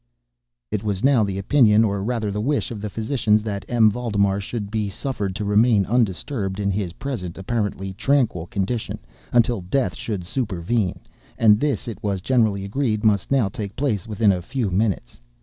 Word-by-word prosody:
It 105 -1 -2
was 100 -3 -2
now 135 -4 +5
the 100 -2 -2
opinion, 110 +1 +4
or 100 -2 0
rather 110 -2 -1
the 105 +1 -2
wish, 140 +2 0
of 110 -3 -6
the 105 - -3
physicians, 110 -1 +1
that 100 -3 -3
M. 115 -3 +5
Valdemar 100 -4 0
should 100 0 -5
be 105 -2 -1
suffered 100 -3 -3
to 105 0 -3
remain 105 0 +4
undisturbed 105 -2 -1
in 100 -1 0
his 95 -3 -2
present 100 -11 -5
apparently 95 -2 -2
tranquil 115 - +1
condition, 110 +1 -2 0.3
until 120 -3 +3
death 120 +9 0
should 100 -5 -4
supervene—and 105 - 0
this, 145 -2 -1
it 110 -5 -6
was 100 -2 -1
generally 110 -3 +1
agreed, 110 0 -1
must 105 -2 +2
now 135 -6 +3
take 100 +1 -6
place 115 -10 -1
within 105 -1 +3
a 90 -2 -1
few 115 +1 -2
minutes. 100 - -1
105 Hz, 170 wpm, -22 LUFS, 100-120 Hz, 0.3 s, now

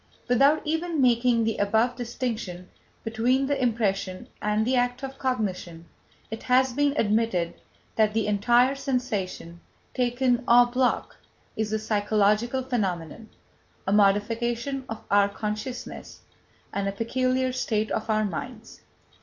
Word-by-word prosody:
Without 275 +5 +4
even 320 +1 -1
making 240 -2 +3
the 225 0 -1
above 220 +4 +2
distinction 230 -7 -4 0.4
between 240 +4 +1
the 280 -1 -1
impression 200 -6 -1
and 210 +1 +1
the 255 +2 +1
act 245 +1 0
of 270 0 -6
cognition, 185 -9 -3 0.5
it 220 - -5
has 255 0 +3
been 285 +2 +1
admitted 210 -5 +1 0.4
that 215 -1 +3
the 225 - +1
entire 240 +5 +3
sensation, 235 - -3 0.3
taken 250 0 +1
en 240 +1 +6
bloc, 255 0 0 0.4
is 215 -1 -2
a 220 - +1
psychological 215 +3 +1
phenomenon, 205 - -3 0.6
a 195 - 0
modification 230 +6 +1
of 225 - -6
our 200 0 +4
consciousness 215 +5 -6 0.5
and 200 0 -1
a - - 0
peculiar 255 +4 0
state 220 -4 -1
of 220 - -2
our 215 0 +2
minds. 220 +5 -7
230 Hz, 130 wpm, -26 LUFS, 210-255 Hz, 0.6 s, en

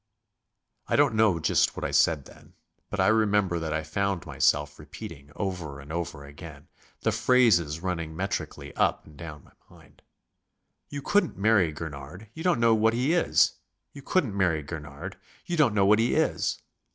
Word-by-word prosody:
I - - +1
don't - - +4
know 110 -6 +3
just 80 - +2
what - - -5
I - - -2
said 75 -5 +3
then, - - -17 0.3
but 105 - -4
I 95 - +4
remember 105 -5 +2
that 80 -1 -4
I 80 0 -1
found 95 +3 -2
myself 75 0 +1
repeating 70 +1 -10
over 90 -8 -4
and 70 +3 -9
over 85 -4 -4
again, 75 0 -12 0.3
the 115 - +1
phrases 110 -9 +3
running 85 -4 -3
metrically 100 +4 -4
up - - +1
and 75 - -16
down 75 -3 -9
my - - -22 0.2
mind: - - -20 0.9
"You 145 -1 -6
couldn't 205 - +1
marry 100 -5 +3
Gurnard; 75 +6 -8
you 160 - -8
don't 180 -7 +2
know 115 -1 +4
what 110 +1 +3
he 130 +7 +1
is. 175 - +3 0.4
You 140 - -10
couldn't 135 - 0
marry 85 -6 +1
Gurnard; 75 +4 -8 0.3
you 175 - -2
don't 140 -10 +3
know 100 -2 +4
what 105 +2 +5
he 115 +2 +2
is." - - 0
90 Hz, 175 wpm, -27 LUFS, 75-110 Hz, 0.9 s, what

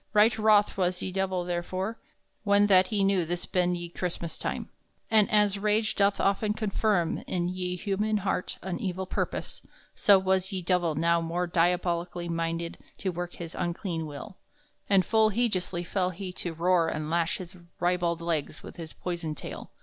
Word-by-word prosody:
Right 215 +2 +5
wroth 215 -2 +4
was 180 -1 0
ye 190 - -3
Divell, 190 -1 -1
therefore, 185 +5 -3 0.4
when 205 0 +4
that 190 -2 +5
he 205 -3 +1
knew 195 -2 +3
this 175 +2 -3
ben 180 -1 +1
ye 175 0 -5
Chrystmass 170 -1 -4
time. - - -3 0.4
And 215 -2 +5
as 205 -2 +3
rage 215 +1 +1
doth 200 0 +2
often 205 +2 +1
confirm 205 -4 +1
in 175 -1 -1
ye 180 0 -3
human 210 +3 0
harte 185 - -1
an 185 -2 -3
evill 190 -1 -2
purpose, - - -3 0.3
so 200 -1 +6
was 190 +1 +1
ye 185 -2 -3
Divell 175 -3 +1
now 170 +2 +2
more 170 +2 -1
diabolically 175 0 0
minded 165 0 -2 0.2
to 190 - -2
work 175 0 -5
his 170 -1 -8
unclean 175 -2 -3
will, 150 +7 -9 0.5
and 195 -2 +4
full 220 -1 +4
hejeously 190 -6 0
fell 180 +1 0
he 185 0 -6
to 175 -2 -4
roar 170 0 +3
and 155 -1 -3
lash 170 -1 +1
his 185 0 -9 0.2
ribald 175 -1 +1
legs 160 -3 -2
with - - -10
his 165 -2 -8
poyson 170 -3 -4
taile. - - -8
180 Hz, 170 wpm, -28 LUFS, 170-200 Hz, 0.5 s, so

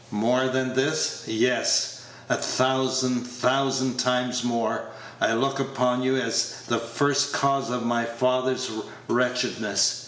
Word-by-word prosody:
More 125 +5 +1
than 130 0 -1
this 145 +4 0
yes, 125 +3 +1 0.3
a - - +2
thousand, 130 -1 +1
thousand 130 +1 0
times 125 0 0
more 115 -2 -1 0.3
I - - +3
look 135 +3 0
upon 125 -2 0
you 130 +1 +1
as 115 -2 -1
the 115 - 0
first 140 +5 0
cause 140 -2 +1
of 125 -1 -2
my 120 0 +1
father's 130 +2 0 0.4
wretchedness. 125 -4 +1
125 Hz, 125 wpm, -25 LUFS, 120-130 Hz, 0.4 s, I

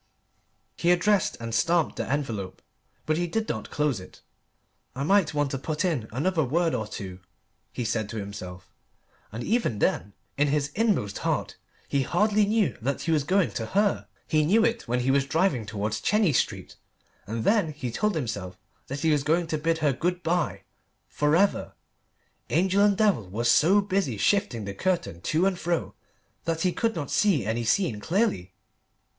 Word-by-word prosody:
He 170 - +1
addressed 185 +3 +2
and 115 -1 -5
stamped 165 +5 +1
the - - -3
envelope; 110 -10 -3 0.4
but 155 0 +1
he 175 0 0
did 220 +5 -2
not 110 -2 -4
close 150 -7 0
it. 90 - -14 0.7
"I 135 - -2
might 190 -1 +3
want 145 -2 +1
to 135 - -3
put 155 +4 -2
in 145 -11 -1
another 160 +7 +1
word 165 +5 +1
or 110 -4 -2
two," 95 -3 -7 0.5
he 120 - -4
said 110 -2 -1
to 115 - -5
himself. 95 -3 -8 0.6
And 115 +3 -5
even 220 - 0
then 100 0 0 0.3
in 145 - +4
his 140 -1 0
inmost 205 - 0
heart - - -1 0.3
he 140 - +1
hardly 210 - +2
knew 210 - +1
that 135 +4 -2
he 165 - -1
was 155 -3 +2
going 185 +4 +2
to 115 - -4
her. 205 -1 +2 0.2
He 155 -1 +2
knew 215 +9 +4
it 230 - -1
when 125 +1 0
he 130 +2 +2
was 135 0 +2
driving 145 - +1
towards 105 +1 -3
Chenies 210 - +3
Street, - - -4 0.5
and 110 +2 -3
then 200 - +2
he 135 -5 -5
told 210 - 0
himself 105 - -4 0.3
that 140 +1 -5
he 160 0 +3
was 150 -2 +2
going 165 +4 +1
to 160 -1 -2
bid 165 +2 +1
her 140 - +3
good 180 +6 -2
bye 170 0 -1 0.5
for 150 +1 +1
ever. 200 +3 +1 0.8
Angel 190 +3 +3
and 205 -2 +3
devil 200 - +2
were 110 +5 -3
so 165 +12 +5
busy 195 - -1
shifting 125 - +1
the 100 - -5
curtain 170 - -2
to 160 - +1
and 190 -2 0
fro 170 -1 -1 0.5
that 165 -1 -1
he 180 0 +1
could 230 -3 0
not 145 -5 -4
see 185 - +2
any 115 +2 -1
scene 115 - +1
clearly. 105 - -1
150 Hz, 180 wpm, -26 LUFS, 115-185 Hz, 0.8 s, so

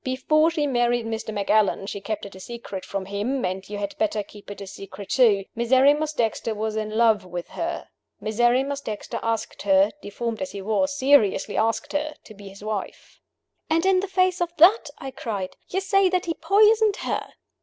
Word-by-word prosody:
Before 305 +5 +2
she 320 -3 -1
married 240 -3 +1
Mr. 225 -1 -4
Macallan 205 -1 +1
she 200 0 -5
kept 215 +1 -4
it 200 - -10
a 190 - -11
secret 205 -3 -7
from 195 -1 -4
him, 210 +7 -2
and 185 +1 -4
you 205 - -4
had 200 0 -4
better 215 -1 0
keep 205 0 -14
it 205 - -8
a 200 - -7
secret 195 0 -10
too 215 -7 +4
Miserrimus 275 +6 +3
Dexter 225 -3 -1
was 215 +1 -2
in 215 -1 -2
love 225 -3 +4
with 180 -1 -7
her. 335 0 -4 0.3
Miserrimus 245 +6 +1
Dexter 215 -6 -5
asked 230 -1 -3
her 195 0 +4
deformed 230 +3 -4
as 280 - -4
he 200 - -6
was, 280 +8 0
seriously 260 -8 +3
asked 225 +6 0
her 300 +1 -2
to 215 - -13
be 205 -1 -12
his 195 +1 -13
wife." 215 -2 -6 0.5
"And 330 +3 +2
in 380 -1 +4
the 390 - -2
face 370 -1 +1
of 350 - +1
that," 380 +8 +6
I 270 - -7
cried, 200 -8 -5
"you 380 - 0
say 390 0 +3
that 365 0 0
he 335 - -1
poisoned 425 +2 +4
her!" - - -3
230 Hz, 195 wpm, -24 LUFS, 205-295 Hz, 0.5 s, that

